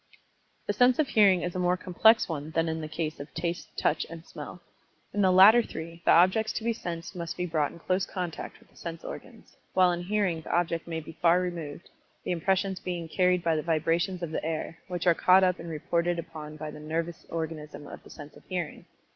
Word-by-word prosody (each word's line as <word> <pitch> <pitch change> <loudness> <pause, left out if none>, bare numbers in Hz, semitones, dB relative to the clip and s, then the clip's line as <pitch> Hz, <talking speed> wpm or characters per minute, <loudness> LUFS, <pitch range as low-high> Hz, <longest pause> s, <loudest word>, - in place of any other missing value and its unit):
The - - 0
sense 250 -1 +4
of 305 -3 +1
Hearing 195 -5 +5
is 175 - -2
a - - -1
more 180 0 +2
complex 220 +5 +4
one 155 -2 -4
than 165 +1 0
in 160 0 -2
the 155 - -4
case 155 -1 -4
of 140 +2 -8
Taste, 170 +1 -3
Touch 155 - +1
and 165 0 -9
Smell. 180 - -9 0.5
In 205 - +1
the 190 - +5
latter 200 +6 +8
three 165 -5 -8
the - - +2
objects 185 +6 +4
to - - -4
be 230 0 +1
sensed 175 -3 -6
must 170 -2 -5
be 180 - -1
brought 155 -4 0
in - - -12
close 185 +3 -1
contact 180 -4 -5
with - - -24
the - - -27
sense 165 -1 -7
organs, - - -10 0.2
while 185 -1 +5
in 175 0 -2
Hearing 185 -3 0
the - - -7
object 170 -1 -1
may 165 -1 -3
be 155 - -10
far 175 +1 +5
removed, 170 -3 -5 0.3
the - - -3
impressions 190 +2 0
being 175 -2 -4
carried 180 +1 +2
by 165 -1 +2
the 155 - 0
vibrations 170 +3 0
of 165 - -3
the - - -3
air, 160 +1 -4
which 175 -1 -4
are 175 - +6
caught 185 +3 +5
up 180 -1 +2
and 170 - -7
reported 170 +2 -1
upon 155 -2 -7
by 155 0 -6
the 150 - -10
nervous 165 +2 -3
organism 160 -2 -5
of - - -10
the - - -16
sense 150 -1 -11
of - - -16
Hearing. 175 -4 -4
170 Hz, 225 wpm, -28 LUFS, 160-185 Hz, 0.5 s, latter